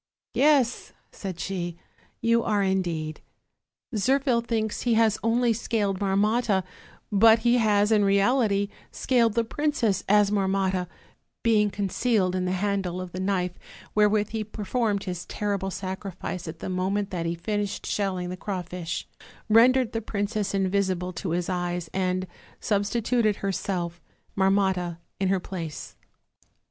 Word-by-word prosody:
'Yes,' 275 -5 +2 0.2
said 185 -4 -6
she, 175 -3 -3 0.4
'you 230 0 +3
are, 205 -2 +1
indeed; 170 -5 -1 0.7
Zirphil 255 +2 +2
thinks 225 -2 -2
he 240 -2 +2
has 220 -2 +3
only 235 +1 +3
scaled 205 -3 -1
Marmotta; 205 +1 +2 0.5
but 220 +2 +6
he 240 +1 +5
has 210 -1 +3
in 210 -2 +4
reality 200 0 +2 0.2
scaled 235 -4 +2
the 230 - +3
prin 295 +6 -1
cess, 205 -8 +1
as 205 0 +5
Marmotta, 190 -2 +1 0.6
being 215 -2 +4
concealed 200 -1 0
in 185 0 0
the 180 - 0
handle 190 -2 -1
of 185 -1 -6
the 185 - -6
knife 185 -2 0 0.4
wherewith 210 0 +3
he 220 -1 -2
performed 210 0 -1
his 180 -2 -5
terrible 200 -2 -2
sacrifice 185 -2 -5
at 160 0 -8
the - - -4
moment 195 +2 -1
that 170 -3 -2
he 170 - -1
finished 205 +3 -3
shelling 185 -3 -1
the 180 - -4
crawfish, 180 -3 -4 0.4
rendered 240 +2 +5
the 225 - -2
princess 205 -1 -2
invisible 190 -2 0
to 175 +1 -4
his 175 +1 -1
eyes, 175 -2 -2
and 185 0 0 0.3
substituted 215 +2 +1
herself, 180 -3 -3 0.3
Marmotta, 190 -3 +1 0.2
in 195 - +1
her 190 0 +2
place.' 170 -4 -6
200 Hz, 135 wpm, -26 LUFS, 185-220 Hz, 0.7 s, but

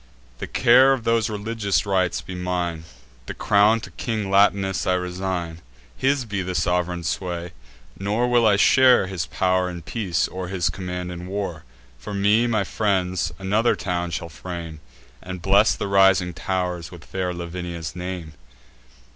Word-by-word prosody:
The - - -5
care 130 +2 +5
of 130 -4 -3
those 115 -2 +1
religious 105 -2 -1
rites 95 -3 0
be 95 - -8
mine; 90 -2 -3 0.4
The - - -6
crown 105 +2 +3
to - - -9
King 110 -4 -3
Latinus 100 -1 +2
I 90 - +3
resign: 90 -2 -3 0.4
His 135 -1 +1
be 100 -3 -3
the 90 0 -4
sov'reign 90 -1 0
sway. 90 0 -3 0.5
Nor 105 +5 0
will 120 -2 +4
I 105 - +5
share 125 +2 +5
His 95 -3 -4
pow'r 90 0 +1
in 85 -1 -7
peace, 85 +1 -1
or 90 0 -6
his 90 -2 -1
command 90 -1 -5
in 90 0 -7
war. 95 -5 -4 0.3
For 100 +11 -6
me, 105 +4 +3
my 110 -4 +1
friends 95 -3 0
another 105 +5 +1
town 90 -2 -2
shall 85 0 -4
frame, 80 +2 -7 0.4
And 90 0 -7
bless 100 +4 +4
the 105 - -3
rising 95 -2 +4
tow'rs 90 -1 -3
with 85 -3 -12
fair 95 -1 -3
Lavinia's 85 -2 -6
name." 90 -3 -6
95 Hz, 155 wpm, -23 LUFS, 90-100 Hz, 0.5 s, care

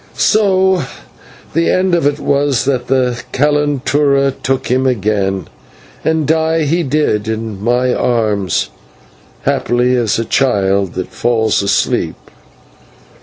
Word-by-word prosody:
So 190 -3 +3 0.7
the 165 +2 +1
end 185 0 +1
of 170 -4 +2
it 145 0 -1
was 140 -2 +1
that 130 -3 -1
the 125 -2 0
/calentura/ 145 -1 +1
took 135 0 -1
him 130 +2 +1
again, 100 -6 -1 0.6
and 160 0 +1
die 160 +1 +1
he 165 +4 +1
did 135 -8 0
in 110 -2 -4
my 125 +2 +1
arms, 105 -6 0 0.7
happily 125 +1 +1
as 120 -4 0
a 115 - -2
child 100 -7 +1
that 95 - -4
falls 110 -3 +1
asleep. 100 - 0
130 Hz, 120 wpm, -15 LUFS, 110-150 Hz, 0.7 s, So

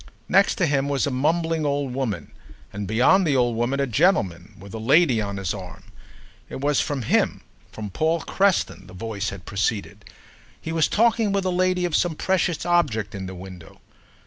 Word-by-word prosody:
Next 195 +1 +3
him 140 -5 +1
was 140 -1 +1
a 140 - -2
mumbling 160 +4 0
old 140 -3 -1
woman, 110 - -3 0.4
and 105 0 -5
beyond 125 - +4
the 145 - +2
old 120 -2 +2
woman 120 +4 -1
a 140 - +2
gentleman 105 - +1
with 100 +2 -12
a 110 - -5
lady 130 0 +4
on 100 -1 -4
his 95 -1 -2
arm. 95 -2 -9 0.7
It - - -6
was 145 +1 +1
from 140 -4 -3
him, - - +1 0.3
from 105 -2 -7
Paul 160 - 0
Creston, 195 - 0
the 90 - -13
voice 100 0 -3
had 95 -2 -9
proceeded: 100 0 -2 0.5
he 160 - -6
was 160 -2 +2
talking 225 -1 +2
with 200 -1 0
the 185 - 0
lady 185 0 +1
of 170 -3 -1
some 175 -3 +1
precious 180 -2 0
object 135 - +1
in 95 -2 -5
the 95 - -7
window. 90 -2 -11
135 Hz, 185 wpm, -23 LUFS, 100-165 Hz, 0.7 s, beyond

